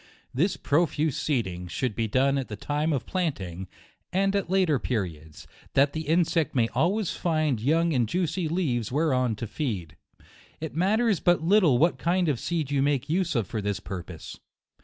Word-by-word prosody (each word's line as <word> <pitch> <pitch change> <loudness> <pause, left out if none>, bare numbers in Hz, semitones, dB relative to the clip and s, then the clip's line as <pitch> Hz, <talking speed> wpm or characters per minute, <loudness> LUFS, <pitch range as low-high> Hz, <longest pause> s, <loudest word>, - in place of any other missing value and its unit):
This 170 +9 +1
profuse 150 -1 +1
seeding 95 - -2
should 125 +6 -2
be 115 - 0
done 135 +5 +2
at 135 - -4
the 105 - -6
time 150 +8 -1
of 130 -6 -1
planting, 95 - -3 0.4
and 195 +2 +1
at 200 -4 -1
later 180 -7 +2
periods, 80 - -4 0.3
that 140 +1 +4
the 160 -2 -4
insect 165 -1 +1
may 115 -3 +3
always 195 +3 +1
find 155 -8 0
young 165 +6 +2
and 120 -5 +1
juicy 175 +1 -1
leaves 135 - -1
whereon 130 -5 +1
to 110 - -5
feed. 105 - -4 0.6
It 160 -1 -5
matters 205 +3 +2
but 175 -2 +2
lit 200 +6 +5
tle 145 -10 +4
what 165 +7 +2
kind 175 0 +1
of 135 -6 0
seed 160 -5 -2
you 140 -1 +2
make 140 0 0
use 175 -2 0
of 115 -4 +1
for 110 +4 -4
this 100 0 -2
purpose. 90 -5 -8
145 Hz, 180 wpm, -26 LUFS, 115-170 Hz, 0.6 s, lit